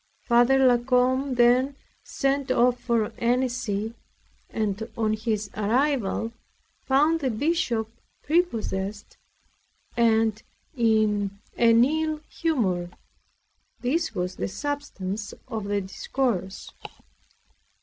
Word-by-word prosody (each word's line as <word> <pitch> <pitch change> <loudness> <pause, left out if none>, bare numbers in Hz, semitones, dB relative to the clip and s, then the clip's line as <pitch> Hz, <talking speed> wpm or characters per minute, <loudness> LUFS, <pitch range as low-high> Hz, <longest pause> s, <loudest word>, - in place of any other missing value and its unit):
Father 240 +2 +4
La 255 -2 +5
Combe 255 +2 +1
then 250 +3 +4 0.3
set 275 -1 -1
off 245 0 +3
for 230 -3 0
Annecy, 235 -3 0 0.6
and 215 0 -2
on 220 -1 +1
his 215 -2 -2
arrival 230 0 0 0.5
found 300 +5 +3
the 270 -4 0
Bishop 240 -3 0 0.4
prepossessed, 215 - -1 0.8
and 225 -2 +2 0.3
in 215 -4 +1 0.2
an 230 0 +5
ill 310 +1 -1
humor. 195 - -1 0.9
This 305 +1 -1
was 180 0 -3
the - - -2
substance 210 -4 -4
of 220 -2 -4
the 205 0 0
discourse. 190 0 -3
235 Hz, 95 wpm, -25 LUFS, 210-265 Hz, 0.9 s, La